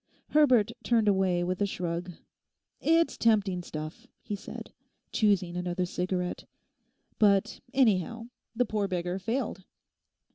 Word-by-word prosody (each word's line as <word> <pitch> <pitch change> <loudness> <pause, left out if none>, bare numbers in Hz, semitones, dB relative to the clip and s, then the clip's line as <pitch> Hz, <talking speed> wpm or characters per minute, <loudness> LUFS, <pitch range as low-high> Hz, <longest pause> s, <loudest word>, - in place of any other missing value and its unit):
Herbert 255 -8 +4
turned 230 -3 +2
away 190 -3 +2
with 185 +2 -2
a 205 - +3
shrug. 175 -1 -3 0.7
'It's 330 +1 +2
tempting 205 -5 +2
stuff,' 155 +8 -7 0.2
he 210 - -3
said, 200 - -9 0.4
choosing 195 -5 +2
another 180 0 -1
cigarette. 180 0 -3 0.7
'But 200 -2 +3
anyhow, 230 -2 +1 0.3
the 250 +2 +2
poor 210 -2 -1
beggar 180 0 -2
failed. 225 -2 -2
195 Hz, 115 wpm, -29 LUFS, 180-225 Hz, 0.7 s, Herbert